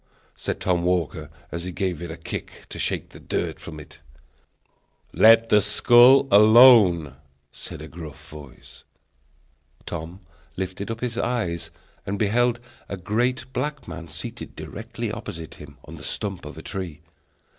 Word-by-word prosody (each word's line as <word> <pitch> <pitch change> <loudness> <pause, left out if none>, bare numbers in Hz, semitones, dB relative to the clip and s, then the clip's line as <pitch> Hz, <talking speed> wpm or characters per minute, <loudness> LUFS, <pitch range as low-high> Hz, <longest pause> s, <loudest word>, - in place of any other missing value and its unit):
said - - -4
Tom 90 -2 +1
Walker, 85 -3 -1 0.2
as 85 0 -5
he 90 - -5
gave 90 -3 -3
it 85 - -6
a 80 - -7
kick 80 - -7
to - - -8
shake - - -2
the - - -13
dirt - - -3
from 80 -1 -9
it. 75 - -14 1.1
"Let 115 +1 +6
that 105 - +5
skull 120 +6 +6
alone!" 105 - +7 0.3
said 75 - -9
a - - -8
gruff 80 -3 -10
voice. 75 -4 -13 1.0
Tom 85 +3 -7 0.4
lifted 95 +2 -4
up 115 0 -5
his 120 -1 -2
eyes 85 -10 -2 0.3
and 100 +1 -3
beheld 120 +3 +1 0.3
a 100 - -4
great 120 +7 -1
black 145 0 -3
man 85 - -8
seated - - -8
directly - - -6
opposite 80 -1 -7
him, 70 -2 -12
on 80 +2 -10
the 75 - -11
stump 100 0 -4
of - - -9
a - - -9
tree. 85 -6 -6
95 Hz, 150 wpm, -24 LUFS, 80-115 Hz, 1.1 s, alone